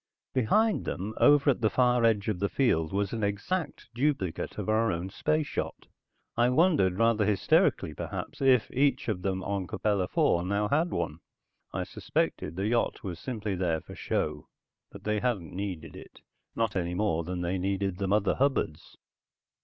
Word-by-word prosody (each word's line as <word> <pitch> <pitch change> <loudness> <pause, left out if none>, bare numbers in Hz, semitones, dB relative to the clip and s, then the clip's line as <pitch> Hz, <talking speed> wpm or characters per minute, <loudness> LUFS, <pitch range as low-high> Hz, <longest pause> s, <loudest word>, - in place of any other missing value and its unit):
Behind 210 - +2
them, 100 +4 -4
over 145 0 +5
at 125 - -3
the 110 - +3
far 125 -1 +3
edge 105 -3 +2
of 105 -5 -1
the 100 +1 0
field, 80 - +1
was 100 +1 -1
an 110 -2 -2
exact 135 - -2
duplicate 120 - -1
of - - -4
our 110 +1 +2
own 85 +3 -4
space 145 +7 -1
yacht. - - -3 0.5
I 120 +1 +3
wondered, 130 - +3
rather 115 -1 +3
hysterically 100 -1 +2
perhaps, - - -6
if 130 -4 +4
each 140 0 +1
of 95 -4 -2
them 95 -1 -2
on 100 -2 -2
Capella 100 -1 0
IV 90 0 +1
now 100 +1 0
had 160 +5 +2
one. 85 - -3 0.5
I - - -2
suspected 80 - -2
the 95 +2 -2
yacht 115 +1 0
was 90 -4 -5
simply 110 -4 -3
there 90 -3 0
for - - -12
show, 75 -1 -2 0.4
that - - -12
they 105 0 0
hadn't 105 -11 -2
needed 90 -4 -5
it, - - -13 0.3
not 115 -3 0
any 90 -1 -1
more 90 -5 0
than 90 +1 -4
they 90 +2 -1
needed 95 0 -1
the 100 - -1
mother 105 0 +2
hubbards. 135 - -1
105 Hz, 175 wpm, -28 LUFS, 90-120 Hz, 0.5 s, over